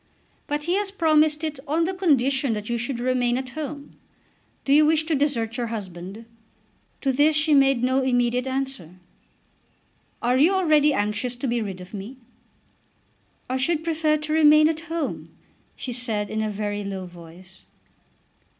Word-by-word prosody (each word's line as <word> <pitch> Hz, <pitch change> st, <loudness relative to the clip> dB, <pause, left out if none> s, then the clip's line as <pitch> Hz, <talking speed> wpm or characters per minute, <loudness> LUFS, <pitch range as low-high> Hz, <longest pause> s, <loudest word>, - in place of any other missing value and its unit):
"But 295 Hz, 0 st, -2 dB
he 345 Hz, +3 st, -1 dB
has 410 Hz, -1 st, 0 dB
promised 310 Hz, -4 st, +2 dB
it 310 Hz, -3 st, -3 dB
on 315 Hz, +4 st, +1 dB
the 370 Hz, +3 st, -1 dB
condition 275 Hz, -7 st, +2 dB
that 210 Hz, 0 st, -5 dB
you 235 Hz, -, 0 dB
should 240 Hz, +1 st, -3 dB
remain 245 Hz, -1 st, +1 dB
at 260 Hz, -1 st, -5 dB
home. 290 Hz, 0 st, -7 dB, 0.7 s
Do 275 Hz, -, +3 dB
you 300 Hz, +1 st, +6 dB
wish 310 Hz, +1 st, +3 dB
to 320 Hz, +1 st, -2 dB
desert 260 Hz, -5 st, 0 dB
your 240 Hz, -1 st, -2 dB
husband?" 195 Hz, -1 st, -7 dB, 0.8 s
To 270 Hz, -, +1 dB
this 295 Hz, +4 st, +3 dB
she 305 Hz, 0 st, +2 dB
made 270 Hz, -3 st, +4 dB
no 260 Hz, +1 st, +2 dB
immediate 245 Hz, 0 st, +1 dB
answer. 260 Hz, -10 st, -4 dB, 1.2 s
"Are 245 Hz, +2 st, +1 dB
you 320 Hz, +8 st, +4 dB
already 305 Hz, -5 st, +4 dB
anxious 210 Hz, +1 st, -1 dB
to 245 Hz, -, -5 dB
be 235 Hz, -1 st, 0 dB
rid 195 Hz, -4 st, -5 dB
of 180 Hz, +3 st, -12 dB
me?" 210 Hz, +6 st, -7 dB, 1.3 s
"I 255 Hz, -, -1 dB
should 310 Hz, +4 st, 0 dB
prefer 315 Hz, -2 st, +1 dB
to 305 Hz, 0 st, -4 dB
remain 305 Hz, -1 st, +6 dB
at 320 Hz, 0 st, -1 dB
home," 240 Hz, -, -4 dB, 0.5 s
she 255 Hz, -, -6 dB
said 225 Hz, -4 st, -1 dB
in 220 Hz, -, -1 dB
a 215 Hz, -, -1 dB
very 205 Hz, 0 st, -3 dB
low 195 Hz, -2 st, -5 dB
voice. 175 Hz, +1 st, -14 dB
260 Hz, 165 wpm, -24 LUFS, 220-305 Hz, 1.3 s, you